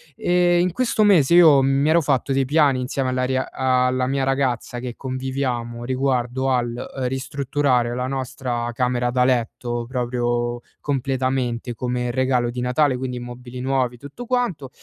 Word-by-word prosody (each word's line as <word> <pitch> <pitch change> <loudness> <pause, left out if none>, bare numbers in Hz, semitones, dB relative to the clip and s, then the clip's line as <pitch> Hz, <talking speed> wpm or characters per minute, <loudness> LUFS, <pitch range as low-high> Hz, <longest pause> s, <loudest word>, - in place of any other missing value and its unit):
e 175 0 +2
in 180 0 +2
questo 235 -1 +1
mese 170 -7 +4
io 155 -6 +7
mi 135 +3 +2
ero 170 +1 +5
fatto 140 -3 0
dei 135 0 +2
piani 145 -2 +3
insieme 130 +1 -2
alla 130 0 -1
ria 130 0 -1
alla 130 -1 +1
mia 135 0 0
ragazza, 130 -3 -1
che 120 -1 -6
conviviamo, 130 -3 -3
riguardo 130 0 -1
al, 125 -2 +1 0.3
uhm, 130 -2 -1
ristrutturare 135 -2 0
la 125 +1 -2
nostra 130 -3 -3
camera 125 0 0
da 125 0 +2
letto, 120 -1 -1
proprio 120 -1 -1 0.2
completamente, 130 -3 -2
come 125 0 -2
regalo 125 -1 +1
di 125 +1 -4
Natale, 130 +2 +2
quindi 125 -1 -4
i - - -4
mobili 120 +1 -9
nuovi, 130 -2 0
tutto 145 - -9
quanto, 230 - -1
130 Hz, 160 wpm, -22 LUFS, 125-135 Hz, 0.3 s, io